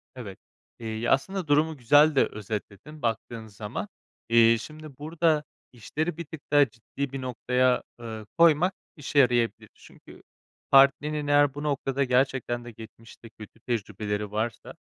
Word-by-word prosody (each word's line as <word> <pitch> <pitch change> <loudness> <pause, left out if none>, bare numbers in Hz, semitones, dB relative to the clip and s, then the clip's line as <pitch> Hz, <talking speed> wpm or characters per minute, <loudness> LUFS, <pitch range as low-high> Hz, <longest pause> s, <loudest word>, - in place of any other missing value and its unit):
Evet, 105 -7 -9 0.4
eee, 110 0 -4
aslında 185 +5 0
durumu 150 +2 +2
güzel 145 +5 +5
de 135 - +5
özetledin 105 +8 -7
baktığın 115 -1 -3
zaman. 105 0 -6 0.4
Eee, 115 0 +5
şimdi 155 0 -11
burada 155 0 0 0.3
işleri 155 +8 -4
bir 170 - -6
tık 155 0 -10
daha 145 -4 +5
ciddi 125 +5 -6
bir 135 -1 -5
noktaya, 125 0 +1 0.2
eee, 110 -2 -7
koymak 170 +2 +4 0.2
işe 145 -1 -1
yarayabilir. 120 -3 +2
Çünkü - - -17 0.5
partnerinin 145 +2 +4
eğer 145 -1 +4
bu 145 +1 -7
noktada 140 -2 -1
gerçekten 125 -2 0
de 120 - -8
geçmişte 115 +1 -14
kötü 110 0 -14
tecrübeleri 105 -3 -3
varsa, 110 +1 -4
130 Hz, 135 wpm, -26 LUFS, 115-150 Hz, 0.5 s, güzel